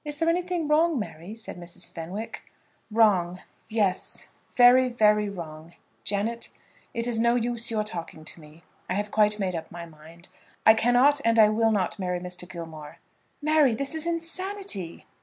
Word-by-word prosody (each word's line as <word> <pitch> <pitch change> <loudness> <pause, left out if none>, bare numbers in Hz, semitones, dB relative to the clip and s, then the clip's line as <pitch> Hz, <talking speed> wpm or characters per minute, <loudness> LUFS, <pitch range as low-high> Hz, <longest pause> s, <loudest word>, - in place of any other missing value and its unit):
"Is 295 -1 -5
there 330 +1 +1
anything 350 -2 -1
wrong, 315 +1 +3
Mary?" 205 -2 -6
said 225 -4 -7
Mrs. 175 0 -8
Fenwick. 180 +7 -6 0.5
"Wrong. 195 -6 +3 0.3
Yes; 205 -4 -1 0.3
very, 250 +1 +7
very 210 -3 +3
wrong. 165 -3 -9 0.3
Janet, 215 +4 -2 0.4
it 230 -1 -3
is 240 -2 -1
no 235 +1 +3
use 240 -1 -1
your 220 -2 0
talking 170 -6 -6
to 165 - -9
me. 155 +2 -16 0.3
I 185 - 0
have 205 +1 -2
quite 210 -1 +3
made 190 -3 -2
up 160 -1 -6
my 170 0 -7
mind. 165 +1 -15 0.4
I 220 - +9
cannot 245 +5 +3
and 230 0 +2
I 215 -1 +7
will 225 +1 +2
not 200 -1 -1
marry 180 -1 -2
Mr. 180 0 -7
Gilmore." 160 -3 -9 0.5
"Mary, 300 -5 +4
this 275 +5 -2
is 320 +1 -1
insanity." 335 - -3
215 Hz, 165 wpm, -26 LUFS, 175-245 Hz, 0.5 s, I